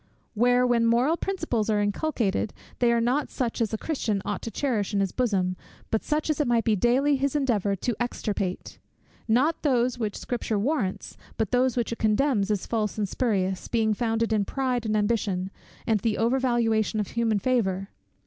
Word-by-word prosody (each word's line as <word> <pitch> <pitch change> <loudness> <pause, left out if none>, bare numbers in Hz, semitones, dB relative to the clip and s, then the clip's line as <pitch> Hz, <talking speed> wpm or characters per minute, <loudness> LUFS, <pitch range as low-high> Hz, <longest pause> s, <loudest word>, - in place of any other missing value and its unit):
where, 245 +2 +3
when 240 -2 +2
moral 240 +7 +3
principles 330 - -2
are 210 -1 +2
inculcated, 210 -1 -1 0.3
they 240 -1 +4
are 235 - +3
not 250 +5 +1
such 240 -2 -2
as 220 - 0
a 220 - -1
Christian 225 -8 -1
ought 205 - -3
to - - -5
cherish 225 -6 -1
in - - +2
his 195 -2 0
bosom, 195 -7 0 0.4
but 220 - 0
such 300 0 -1
as 310 -2 0
it 290 - 0
must 235 -1 +2
be 225 - +1
his 205 - 0
daily 265 +4 +2
endeavour 220 -8 +1
to 230 +5 -2
extirpate; 210 -6 -3 0.5
not 260 +8 +2
those 250 -3 +1
which 215 -3 -2
Scripture 235 -3 -2
warrants, 215 -4 -2 0.2
but 220 - -1
those 250 0 +2
which 235 - 0
it 230 - -4
condemns 215 -1 +2
as 205 -3 -1
false 220 -2 -1
and 210 -2 0
spurious, 190 -5 -1
being 220 -2 +1
founded 225 0 0
in 210 -2 +2
pride 250 0 -1
and 215 0 +1
ambition, 205 -3 0 0.3
and 220 -2 +2
the 215 +1 0
over 235 +4 +2
valuation 225 -4 +1
of 210 - -2
human 230 -2 +1
favour! 195 -4 0
230 Hz, 185 wpm, -26 LUFS, 210-250 Hz, 0.5 s, they